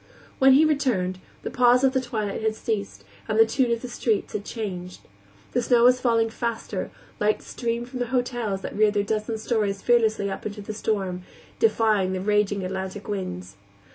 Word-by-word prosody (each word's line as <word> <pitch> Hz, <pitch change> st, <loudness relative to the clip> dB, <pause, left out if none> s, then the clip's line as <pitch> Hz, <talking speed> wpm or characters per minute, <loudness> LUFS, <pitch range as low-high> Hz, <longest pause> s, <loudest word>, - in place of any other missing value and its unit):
When 265 Hz, 0 st, +7 dB
he 295 Hz, +4 st, +6 dB
returned, 235 Hz, -12 st, 0 dB, 0.2 s
the -, -, -4 dB
pause 250 Hz, +1 st, +4 dB
of 265 Hz, -1 st, +4 dB
the 260 Hz, -, +2 dB
twilight 215 Hz, -5 st, -3 dB
had 220 Hz, 0 st, 0 dB
ceased 200 Hz, -, -3 dB, 0.2 s
and 215 Hz, -, 0 dB
the 225 Hz, -, +7 dB
tune 245 Hz, +2 st, +1 dB
of 235 Hz, +1 st, -1 dB
the -, -, -4 dB
streets 230 Hz, -3 st, -1 dB
had 210 Hz, -, -3 dB
changed. 185 Hz, -6 st, -6 dB, 0.5 s
The 245 Hz, -, +1 dB
snow 240 Hz, 0 st, +3 dB
was 250 Hz, +1 st, +6 dB
falling 230 Hz, -2 st, +2 dB
faster, 230 Hz, -5 st, -3 dB, 0.3 s
lights 210 Hz, 0 st, +1 dB
streamed 235 Hz, 0 st, -3 dB
from 250 Hz, 0 st, -7 dB
the 245 Hz, -, -1 dB
hotels 240 Hz, -5 st, -1 dB
that -, -, -6 dB
reared 210 Hz, 0 st, +3 dB
their 205 Hz, -, +2 dB
dozen 215 Hz, +2 st, -2 dB
stories 215 Hz, -3 st, -1 dB
fearlessly 220 Hz, -4 st, +3 dB
up 195 Hz, -, -6 dB
into 205 Hz, 0 st, -6 dB
the 215 Hz, -, -5 dB
storm, 195 Hz, -4 st, -2 dB, 0.4 s
defying 215 Hz, -, +2 dB
the 185 Hz, -, -2 dB
raging 205 Hz, -1 st, +1 dB
Atlantic 190 Hz, +2 st, -5 dB
winds. 100 Hz, -, -5 dB
215 Hz, 185 wpm, -25 LUFS, 200-240 Hz, 0.5 s, When